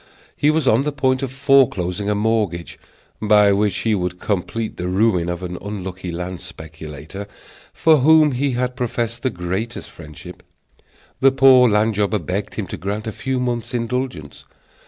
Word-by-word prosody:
He 145 - +2
was 155 -3 +1
on 115 +2 +4
the 150 +1 -1
point 130 -2 0
of 135 -2 -3
foreclosing 120 -9 +2
a 105 - +1
mortgage, 105 -5 -1 0.4
by 105 -1 +5
which 100 0 +1
he 110 - +2
would 90 -2 -2
complete 110 +3 -3
the 90 - -3
ruin 90 -2 +1
of 85 +1 -4
an 90 -1 -5
unlucky 95 -3 -6
land 90 +1 -5
speculator 80 +4 -9 0.4
for 160 -1 +4
whom 155 +2 +5
he 135 +1 -1
had 125 +1 -1
professed 120 -2 -3
the 130 - 0
greatest 95 +5 -4
friendship. 75 -2 -12 0.8
The 135 0 +5
poor 130 -2 +6
land 105 +1 +2
jobber 105 +1 +1
begged 95 +3 -4
him - - -3
to - - -5
grant 100 +3 -4
a 110 - -3
few 130 +4 -3
months' 120 0 -2
indulgence. 120 - -4
105 Hz, 165 wpm, -20 LUFS, 90-125 Hz, 0.8 s, poor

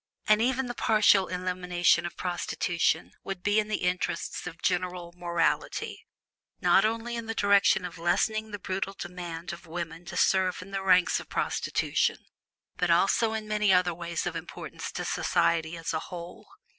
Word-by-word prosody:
And 215 0 +5
even 260 +2 +1
the 245 - -4
partial 215 -4 +4
elimination 180 -1 +1
of - - -11
prostitution 175 -2 -1
would 195 -2 -6
be 205 +1 +3
in 210 - -1
the 215 - -2
interests 180 0 -2
of 170 -1 -8
general 180 -1 -1
morality, 170 -1 -1 0.5
not - - +4
only 230 +2 -1
in 230 -1 -5
the 225 - -3
direction 200 -2 +4
of 175 -1 -8
lessening 215 +6 +1
the 205 - -5
brutal 195 0 -3
demand 175 -1 -6
of 170 0 -11
women 165 0 -5
to 175 0 -6
serve 185 -1 +2
in 195 - -14
the 195 0 -2
ranks 185 -2 +4
of - - -11
prostitution, - - 0 0.6
but 180 - 0
also 195 +6 +3
in 220 -1 -4
many 210 -1 +2
other 180 -1 +4
ways 170 0 -4
of 175 - -3
importance 165 0 -7
to - - -4
society 165 0 +1
as 165 0 -3
a 160 - 0
whole. 175 +1 -9
180 Hz, 170 wpm, -28 LUFS, 175-205 Hz, 0.6 s, And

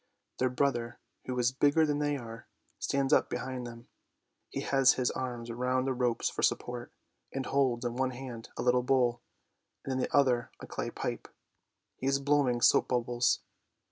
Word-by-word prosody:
Their 130 - +3
brother, 120 -2 0 0.3
who 125 -1 -3
is 125 0 +3
bigger 145 +4 +3
than 145 -1 0
they 145 -1 0
are, 115 -3 -9 0.3
stands 140 -1 +1
up - - +4
behind 130 -2 -4
them; 115 0 -11 0.6
he - - -4
has 135 -2 +4
his 125 -1 0
arms 120 -2 -4
round 125 +2 0
the 135 - 0
ropes 120 -2 0
for - - -3
supports, 120 0 -1 0.4
and 135 -1 -3
holds 130 -3 +1
in 120 0 -2
one 130 0 +1
hand 125 -3 -8
a - - -2
little 125 0 +4
bowl 125 -2 +2 0.6
and 135 - -4
in 130 - -1
the - - -1
other 125 -4 +3
a - - -8
clay - - -4
pipe. - - -4 0.7
He 130 - -3
is 135 0 +3
blowing 140 -3 +2
soap - - +5
bubbles. 120 -1 +1
125 Hz, 175 wpm, -31 LUFS, 120-135 Hz, 0.7 s, soap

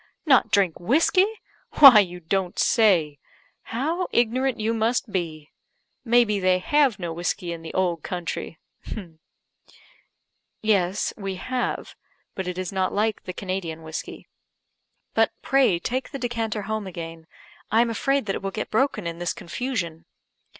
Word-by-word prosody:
Not 270 -5 +5
drink 190 -5 +2
whiskey? 320 - +3 0.5
Why, 265 -7 +10
you 180 -3 -1
don't 180 +2 -2
say! 175 - +3 0.5
How 320 +10 -2
ignorant 250 +2 +1
you 220 +1 0
must 225 0 0
be! 160 -5 -4 0.5
may 240 0 +4
be 210 -2 -1
they 185 -1 +3
have 275 +4 +2
no 170 -3 -4
whiskey 175 +1 -3
in 165 - -8
the 165 - -7
old 175 -3 0
country?" 170 -1 -5 2.0
"Yes, 200 -3 +1
we 195 -2 -4
have; 250 +7 -3 0.4
but 190 -1 -5
it 180 0 -4
is 185 +1 -3
not 190 -1 0
like 215 +1 0
the 185 - -4
Canadian 180 -4 -4
whiskey. 160 0 -7 0.9
But, - - +2
pray 270 -10 +3
take 255 +9 -3
the 280 - -6
decanter 225 -4 -2
home 215 0 -3
again 165 -2 -8 0.4
I 225 +2 +4
am 235 -1 +1
afraid 275 +3 0
that 195 - -1
it - - -4
will 195 - -2
get 215 +2 -5
broken 220 -4 +1
in 170 0 -4
this 175 0 -1
confusion." 170 -7 -4
195 Hz, 150 wpm, -24 LUFS, 175-235 Hz, 2.0 s, Why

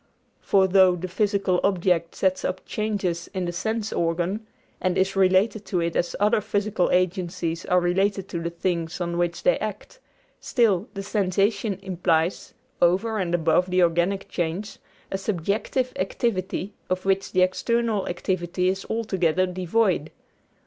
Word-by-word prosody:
For 195 -1 +3
though 185 -1 +5
the 180 +1 -5
physical 195 -1 +1
object 180 -3 +1
sets 185 -1 +1
up 185 - -3
changes 200 -6 -2
in 185 -1 -1
the 175 - -2
sense 220 +5 -2
organ, 175 +6 -1 0.3
and 185 -1 0
is 190 +1 +1
related 195 +3 +3
to 190 -2 -1
it 170 0 -1
as 175 - 0
other 210 +2 +3
physical 205 -2 0
agencies 180 -2 -1
are 180 - +4
related 195 +2 0
to 170 - -3
the 170 - -2
things 170 -1 -2
on 170 -1 -2
which 175 -1 -1
they - - +3
act, - - -6 0.4
still, 215 -5 +1
the 195 - -4
sensation 200 +1 0
implies, 175 -2 0 0.3
over 195 +6 +2
and 175 -2 0
above 175 +2 +2
the 180 0 +3
organic 175 +3 +1
change, 175 +4 -3 0.3
a 195 - -2
subjective 210 +7 -1
activity 190 0 -2 0.2
of 185 0 -1
which 195 0 +1
the 185 - +4
external 225 +2 0
activity 180 0 -1
is 190 +1 -2
altogether 185 -6 +1
devoid. 180 -2 0
185 Hz, 150 wpm, -24 LUFS, 175-200 Hz, 0.4 s, though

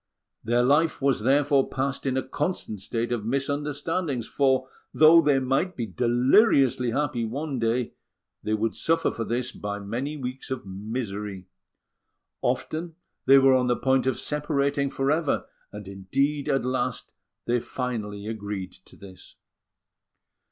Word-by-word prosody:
Their 120 +2 +2
life 150 +5 +3
was, 135 -5 +1
therefore, 140 +2 +3
passed 135 +1 -2
in 130 0 0
a 130 - -2
constant 145 - -3
state 115 +4 -3
of 120 -3 -1
misunderstandings; 145 - -2
for 130 -2 +1 0.2
though 160 +2 +7
they 145 -3 +3
might 135 +8 0
be 120 - -2
deliriously 125 - +3
happy 125 -1 -1
one 135 +4 -3
day, 115 +1 0 0.5
they 110 - 0
would 110 +1 -1
suffer 165 0 +1
for 115 - -4
this 125 +2 -2
by 100 -3 -5
many 120 +9 -4
weeks 130 -1 -6
of 130 -5 -4
misery. 100 -1 -5 1.0
Often 165 +1 -2 0.3
they 135 +1 +8
were 135 -1 +6
on 130 -1 +3
the 120 - +2
point 130 -1 +1
of 130 - +1
separating 140 -1 0
for 135 +1 0
ever; 155 -1 0 0.3
and, 105 -1 -9
indeed, 135 +10 -1
at 135 -3 +1
last 130 -1 -2 0.3
they 120 +1 +1
finally 110 -5 -4
agreed 100 -4 -5
to - - -15
this. 95 -2 -13
130 Hz, 145 wpm, -26 LUFS, 115-140 Hz, 1.0 s, they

